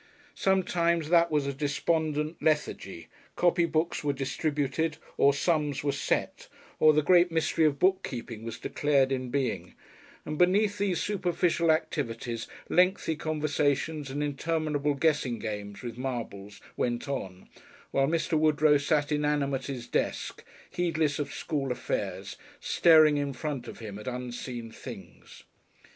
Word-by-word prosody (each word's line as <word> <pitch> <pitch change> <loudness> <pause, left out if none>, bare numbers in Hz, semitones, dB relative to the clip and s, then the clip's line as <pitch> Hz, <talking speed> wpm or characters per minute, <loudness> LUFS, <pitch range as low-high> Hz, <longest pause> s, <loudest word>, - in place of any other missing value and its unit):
Sometimes 170 -4 +1
that 170 0 +5
was 150 -3 +1
a 140 - -2
despondent 150 +2 -1
lethargy; 95 - -1 0.3
copy 175 -1 +3
books 160 0 -1
were 145 -1 +1
distributed 145 +2 -1 0.2
or 140 - +5
sums 150 -1 0
were 145 - +1
"set," - - -2 0.3
or 155 - +7
the 150 0 +2
great 175 +1 +5
mystery 160 0 +2
of 145 -2 +2
bookkeeping 125 - -1
was 115 0 -5
declared 140 -2 +1
in 130 -1 -2
being, 130 -1 -2 0.5
and 150 0 -4
beneath 200 +3 +3
these 195 -3 +1
superficial 175 -4 0
activities 120 -7 -1 0.2
lengthy 180 -2 +2
conversations 150 -1 -1
and 145 +2 -2
interminable 150 0 -1
guessing 140 -5 +1
games 105 -2 -6
with 120 -1 -6
marbles 105 -6 -5 0.2
went 120 +1 -1
on 95 -9 -5 0.4
while 135 0 +2
Mr. 165 +1 0
Woodrow 155 -1 +4
sat 145 +1 +1
inanimate 145 -3 0
at 135 - -2
his 120 -2 -8
desk - - -2 0.3
heedless 160 -5 0
of 145 - -3
school 140 -5 -2
affairs, 95 -5 -3 0.2
staring 155 -3 +5
in 140 -1 -1
front 130 -2 -4
of - - -8
him 105 -3 -7
at 105 - -10
unseen 125 -2 -5
things. - - -11
145 Hz, 135 wpm, -28 LUFS, 130-160 Hz, 0.5 s, or